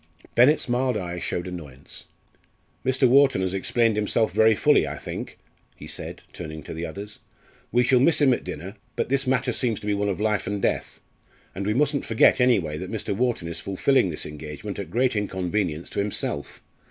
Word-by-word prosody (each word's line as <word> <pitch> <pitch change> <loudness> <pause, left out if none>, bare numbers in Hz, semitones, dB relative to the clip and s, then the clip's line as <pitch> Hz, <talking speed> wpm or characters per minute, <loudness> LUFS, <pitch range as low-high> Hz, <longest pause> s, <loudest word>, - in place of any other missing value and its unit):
Bennett's 130 +6 +4
mild 125 -1 +1
eye 90 -2 -4
showed 85 +1 -3
annoyance. 75 -7 -9 0.8
"Mr. 130 0 +3
Wharton 135 -4 +5
has 95 0 -1
explained 115 +3 +1
himself 105 +1 +1
very 110 0 +5
fully, - - +4
I - - -5
think," - - -6 0.4
he - - -11
said, - - -7
turning 80 -1 -7
to - - -7
the 80 +1 -4
others. 100 +6 -8 0.5
"We 125 +1 +4
shall 125 +1 +4
miss 155 +6 +3
him 140 -4 +5
at - - -3
dinner 95 +7 -7 0.2
but - - -1
this 135 0 +1
matter 130 0 +1
seems 120 -5 -1
to - - -9
be 105 - +1
one 100 0 0
of 100 - -2
life 105 -3 0
and 100 +1 -2
death. - - -2 0.5
And 100 +2 -4
we 105 - +1
mustn't 145 +1 +1
forget 115 +3 +4
anyway 90 -12 +2
that - - -6
Mr. 100 - -3
Wharton 120 -6 0
is 85 0 -5
fulfilling 100 +4 +2
this 80 - -4
engagement 75 0 -7
at - - -5
great 120 +5 +1
inconvenience 95 -4 -2
to - - -3
himself. 100 -7 -3
105 Hz, 190 wpm, -25 LUFS, 90-125 Hz, 0.8 s, Wharton